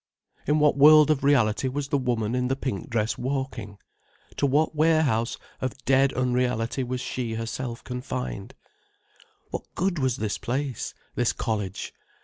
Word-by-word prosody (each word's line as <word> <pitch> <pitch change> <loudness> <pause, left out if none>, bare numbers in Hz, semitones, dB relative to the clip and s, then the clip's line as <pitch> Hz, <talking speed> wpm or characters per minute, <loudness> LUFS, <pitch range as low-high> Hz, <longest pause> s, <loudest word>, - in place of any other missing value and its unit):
In 150 +2 +3
what 150 -2 +4
world 155 +1 +8
of 140 -3 0
reality 130 -4 +3
was 140 +1 -3
the 145 - +2
woman 120 -3 -1
in 125 0 0
the 135 - 0
pink 130 -8 -4
dress 115 -1 -1
walking? 130 -6 -3 0.6
To 140 - +2
what 150 +4 +2
warehouse 150 -7 +2 0.2
of 130 +1 -3
dead 135 0 +4
unreality 125 -1 0
was 125 0 -3
she 120 -4 -3
herself 115 +2 -4
confined? 125 - -5 1.0
What - - -3
good 185 -2 0
was 130 -3 +1
this 105 -1 -2
place, 130 0 -3 0.2
this 120 -1 +1
college? 105 -5 -3
130 Hz, 145 wpm, -26 LUFS, 115-140 Hz, 1.0 s, world